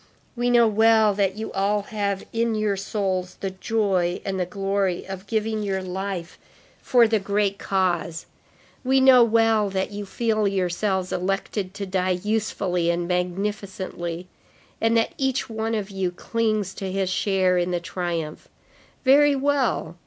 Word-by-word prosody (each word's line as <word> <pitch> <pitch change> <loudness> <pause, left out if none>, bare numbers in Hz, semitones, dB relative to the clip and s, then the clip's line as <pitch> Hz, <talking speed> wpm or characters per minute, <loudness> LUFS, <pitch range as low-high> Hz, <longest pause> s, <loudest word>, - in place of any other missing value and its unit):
we 245 0 0
know 240 -1 +5
well 220 0 +4
that 195 -1 0
you 220 - -5
all 200 +1 +1
have 200 -2 -3
in 230 0 +1
your 215 -2 0
souls 190 -2 -2
the 195 - -3
joy 190 -3 0
and 190 -1 -2
the 180 - -1
glory 195 -1 -1
of 190 +1 -7
giving 220 0 -1
your 195 -2 -2
life 185 -1 -5 0.4
for 240 -2 +4
the 220 -1 +2
great 200 0 0
cause; 175 -3 -1 0.6
we 265 +1 +3
know 260 -2 +7
well 225 -2 +3
that 190 0 -2
you 205 0 -5
feel 215 +1 0
yourselves 190 0 -1
elected 195 +1 -2
to 200 - -4
die 185 -1 0
usefully 195 -5 0
and 170 0 0
magnificently, 180 -1 -3 0.5
and 225 +1 +3
that 225 - +1
each 265 -1 0
one 225 +1 -2
of 205 -2 -3
you 190 -2 -1
clings 215 +1 -1
to 190 -1 -5
his 190 0 -1
share 185 -2 +2
in 175 0 0
the 175 -1 0
triumph. 170 -3 -4 0.6
Very 285 +2 +6
well. 270 - 0
200 Hz, 150 wpm, -24 LUFS, 185-220 Hz, 0.6 s, know